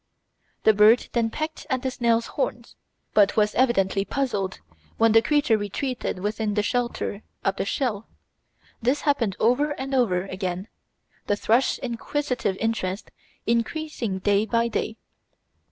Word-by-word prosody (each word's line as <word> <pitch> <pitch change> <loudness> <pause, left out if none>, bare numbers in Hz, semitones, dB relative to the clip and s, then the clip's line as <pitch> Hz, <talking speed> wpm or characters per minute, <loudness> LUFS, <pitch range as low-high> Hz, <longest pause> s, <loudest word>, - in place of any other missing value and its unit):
The 220 - +6
bird 215 +3 +5
then 230 -2 +1
pecked 310 +6 -5
at 260 -2 -1
the 260 - -1
snail's 235 -2 +1
horns, - - -3 0.4
but 205 0 +4
was 210 -1 +3
evidently 195 -6 +2
puzzled 205 -6 -2 0.4
when 225 0 +4
the 225 +1 +6
creature 245 -4 +2
retreated 245 +3 -3
within 210 +1 -1
the 210 - +2
shelter 235 -2 -2 0.2
of 195 - +1
the - - -1
shell. 220 -1 -2 0.7
This 255 +5 +1
happened 240 -10 +1
over 285 +6 +2
and 270 +1 -4
over 200 -9 +2
again, 190 0 -4 0.6
the 205 - +2
thrush's 230 +5 +2
inquisitive 245 -3 -2
interest 215 -4 -2 0.3
increasing 235 -2 -1
day 205 +3 +2
by 230 +2 +1
day. 220 0 -2
225 Hz, 135 wpm, -25 LUFS, 205-255 Hz, 0.7 s, The